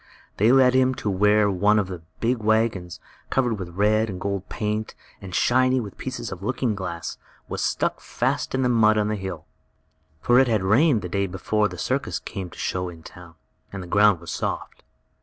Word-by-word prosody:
They 110 +4 +4
led 130 -1 +5
him 130 0 +3
to 105 - -2
where 105 +2 +3
one 105 +3 +3
of 105 - +2
the 90 -2 -7 0.2
big 120 +2 +1
wagons, 110 -5 0 0.3
covered 120 -5 0
with 85 -1 -7
red 110 +2 +2
and 95 -2 -5
gold 100 0 -3
paint, 105 0 -3 0.3
and 95 -2 -7
shiny 130 +1 +3
with 105 -5 -7
pieces 125 -4 -5
of 95 -1 -7
looking 120 +1 -1
glass, 90 -4 -5 0.3
was - - -4
stuck - - 0
fast - - -2
in 130 - +1
the - - +3
mud 110 -2 +4
on 105 0 +1
a - - 0
hill. 95 -5 -6 0.7
For 120 +7 +4
it 135 - +4
had 110 -5 +1
rained 115 - +3
the - - -3
day 100 +3 -1
before 105 +3 0
the 90 -2 -9
circus 135 +8 -1
came 95 -4 -6
to - - -15
show 90 0 -2
in 85 -2 -12
the - - -10
town, 85 -2 -14 0.4
and 95 -1 -6
the - - -8
ground 100 0 +4
was 85 0 -8
soft. - - -4
105 Hz, 205 wpm, -24 LUFS, 95-115 Hz, 0.7 s, led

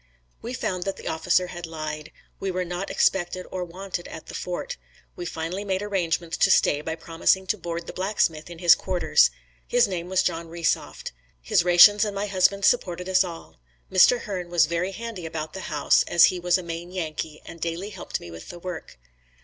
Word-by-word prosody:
We 240 +3 -5
found 185 -6 -2
that 195 - -3
the - - -8
officer 175 +3 +1
had 175 -1 -7
lied. 155 -1 -6 0.3
We 195 - -2
were 185 0 -2
not 180 +2 -4
expected 185 -1 +1
or 185 -1 -3
wanted 180 0 -6
at - - -9
the - - -10
fort. - - -4 0.4
We 355 -2 -5
finally 165 +5 -4
made 190 -1 -1
arrangements 175 -4 -1
to - - +4
stay 145 - +4
by 160 +1 -4
promising 165 +3 +1
to 215 - 0
board 170 0 -4
the - - -8
blacksmith 180 -5 0
in 170 - -9
his 170 0 +7
quarters. 175 - +3 0.4
His 245 -2 +4
name 180 -2 -4
was 190 -1 +2
John 165 0 -2
Resoft. 170 0 -2 0.3
His - - +2
rations 180 +4 +7
and 205 -2 -2
my 200 +1 -1
husband's 195 0 +2
supported 180 0 +1
us 190 0 +4
all. 170 - -9 0.3
Mr. 235 +6 +6
Hern 185 -4 -5
was 175 -1 +4
very 170 +4 -2
handy 220 -6 -6
about 160 -1 -5
the 190 - -6
house, 150 -2 +3
as 170 -1 +7
he 180 - -4
was 175 +1 +2
a 185 - -6
Maine 170 +1 -6
Yankee 155 -3 -5
and 165 - -11
daily 170 +5 -3
helped - - -5
me 85 - -10
with 85 0 -10
the 175 - -8
work. 175 - -7
175 Hz, 200 wpm, -25 LUFS, 165-190 Hz, 0.4 s, his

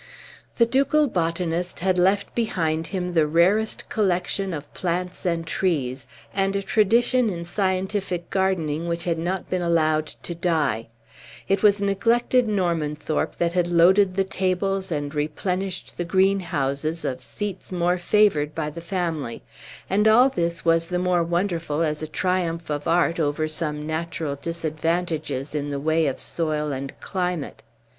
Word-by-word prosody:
The 235 - +6
ducal 280 +5 +3
botanist 170 -3 -1
had 185 0 +2
left 195 +3 +2
behind 165 -8 -1
him 180 -2 -3
the 160 -3 +3
rarest 185 +8 +2
collection 190 -1 0
of 150 -3 -7
plants 180 +1 -3
and 165 -1 0
trees, 140 -8 -1 0.3
and 195 0 0
a 200 - -1
tradition 230 +4 +3
in 170 -3 -4
scientific 185 -1 -1
gardening 170 -5 0
which 170 0 -2
had 170 -2 -1
not 180 +2 -2
been 185 -1 -1
allowed 155 -2 +2
to 170 - -6
die; 160 -10 0 0.6
it 195 - +1
was 205 -1 +4
neglected 235 +5 +2
Normanthorpe 165 -6 -1
that 170 0 0
had 180 -1 +2
loaded 185 +3 +4
the 195 - +2
tables 190 0 -1
and 145 -2 -2
replenished 180 +6 -3
the - - +1
greenhouses 170 -5 0
of 130 -1 -3
seats 195 +7 -5
more 180 0 +1
favored 175 -6 +2
by 150 -2 -2
the 170 - -8
family; 165 -8 -3 0.4
and 210 +3 +2
all 245 +5 +6
this 170 -8 -2
was 165 0 +4
the 180 - -1
more 180 -1 +2
wonderful 170 -2 -1
as 150 -1 -1
a 155 - -3
triumph 170 -1 -1
of 145 0 -3
art 170 0 +2
over 155 0 0
some 150 -1 -2
natural 160 -2 -3
disadvantages 160 -2 -2
in 145 -1 -2
the 140 -1 -2
way 160 +2 +2
of 135 - -2
soil 155 -3 -1
and 135 0 -5
climate. 180 -5 -3
170 Hz, 150 wpm, -24 LUFS, 155-190 Hz, 0.6 s, The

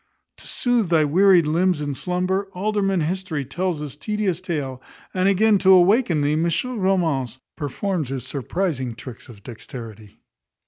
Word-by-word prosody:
To - - -14
soothe 240 -6 0
thy 160 -3 +4
wearied 180 +2 +5
limbs 170 +2 +1
in 145 -1 -3
slumber, 185 +6 -1
Alderman 195 -1 0
History 165 -3 -2
tells 175 +3 -2
his 145 -2 -6
tedious 190 +1 -2
tale; 145 -8 -4 0.3
and, 185 +1 +2
again, 205 +1 +4
to 190 - +2
awaken 185 - +4
thee, 145 +1 +1
Monsieur 170 +10 0
Romance 165 - 0 0.2
performs 155 +1 -3
his 130 -2 -4
surprizing 135 - -3
tricks 125 +1 -10
of 105 -4 -14
dexterity. 110 -3 -10
170 Hz, 145 wpm, -22 LUFS, 140-190 Hz, 0.3 s, wearied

